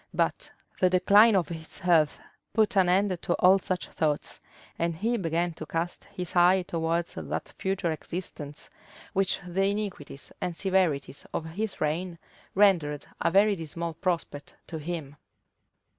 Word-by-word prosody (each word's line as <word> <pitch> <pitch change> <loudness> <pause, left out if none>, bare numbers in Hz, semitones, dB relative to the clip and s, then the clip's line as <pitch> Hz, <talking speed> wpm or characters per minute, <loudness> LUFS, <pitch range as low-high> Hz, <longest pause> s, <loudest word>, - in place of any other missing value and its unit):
But - - 0 0.3
the 185 - +4
decline 200 +4 +6
of 180 -5 +1
his 160 -2 -7
health 165 -4 +3 0.3
put 215 -2 +2
an 185 -2 +4
end 185 -1 +2
to 175 - 0
all 190 +1 +5
such 185 -1 -2
thoughts; 150 -2 -2 0.4
and 170 0 0
he 225 +8 0
began 170 -3 0
to 155 -1 -8
cast 165 +1 -3
his 180 -1 -7
eye 180 +1 +5
towards 170 -1 -1
that - - -5
future 190 -3 0
existence 155 -3 -7 0.4
which 195 -1 +2
the 190 +2 +1
iniquities 200 -8 -3
and 175 - -2
severities 180 -8 0
of 160 - -2
his 195 +6 -4
reign 170 +3 -1 0.4
rendered 165 -8 +3 0.2
a - - +3
very 200 +3 +4
dismal 165 0 -4
prospect 165 -4 -3
to 160 - -6
him. 150 -3 -5
175 Hz, 145 wpm, -28 LUFS, 160-190 Hz, 0.4 s, decline